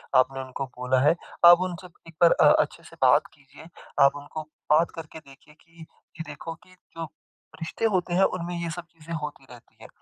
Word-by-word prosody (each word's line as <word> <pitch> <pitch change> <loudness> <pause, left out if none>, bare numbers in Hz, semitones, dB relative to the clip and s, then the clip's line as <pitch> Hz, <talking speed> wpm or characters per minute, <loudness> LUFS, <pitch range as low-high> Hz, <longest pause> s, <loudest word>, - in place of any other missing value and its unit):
आपने 135 +1 +3
उनको 130 +1 -5
बोला 125 +1 +1
है। 150 +4 +4 0.3
आप 175 0 +9
उनसे 185 0 -4 0.2
एक - - -15
बार 170 - +7
अ, - - +5
अच्छे - - -5
से - - -15
बात - - +5
कीजिए। 140 +3 -17 0.4
आप 140 - +3
उनको 145 +2 -7 0.3
बात 160 +3 +4
करके 160 -1 -9
देखिए 140 0 -19
कि 165 -1 -19
ये 160 +1 -12
देखो 145 +3 -7
कि 185 - -21 0.2
जो 165 - -3 0.5
रिश्ते 165 +7 -3
होते 180 -1 0
हैं 190 +2 +4
उनमें 175 -1 -1
ये 170 -1 -3
सब 175 +1 -7
चीज़ें 165 0 -10
होती 150 -2 -7
रहती 120 -2 -16
हैं। - - -11
160 Hz, 200 wpm, -26 LUFS, 140-170 Hz, 0.5 s, आप